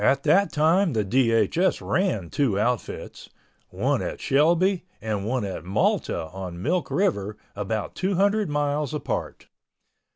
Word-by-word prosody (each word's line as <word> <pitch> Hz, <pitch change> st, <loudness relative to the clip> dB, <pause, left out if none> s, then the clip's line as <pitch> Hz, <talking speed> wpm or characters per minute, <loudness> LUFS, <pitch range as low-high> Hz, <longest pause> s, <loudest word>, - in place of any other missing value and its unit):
At 135 Hz, +4 st, +3 dB
that 200 Hz, +2 st, +4 dB
time 165 Hz, +4 st, +3 dB
the 110 Hz, -3 st, 0 dB
DHS 120 Hz, -, +2 dB
ran 115 Hz, -, 0 dB
two 120 Hz, -9 st, +1 dB
outfits—one 120 Hz, +2 st, -3 dB
at -, -, -4 dB
Shelby 170 Hz, +6 st, +2 dB, 0.2 s
and 105 Hz, -2 st, -3 dB
one 125 Hz, -2 st, -1 dB
at 95 Hz, -, -5 dB
Malta 95 Hz, -3 st, 0 dB
on 90 Hz, -2 st, -6 dB
Milk 170 Hz, -, -1 dB
River 105 Hz, -, 0 dB, 0.2 s
about 105 Hz, +1 st, -3 dB
two 190 Hz, +1 st, -1 dB
hundred 205 Hz, +1 st, +2 dB
miles 145 Hz, 0 st, -1 dB
apart. 145 Hz, -, -4 dB
135 Hz, 130 wpm, -25 LUFS, 105-175 Hz, 0.2 s, that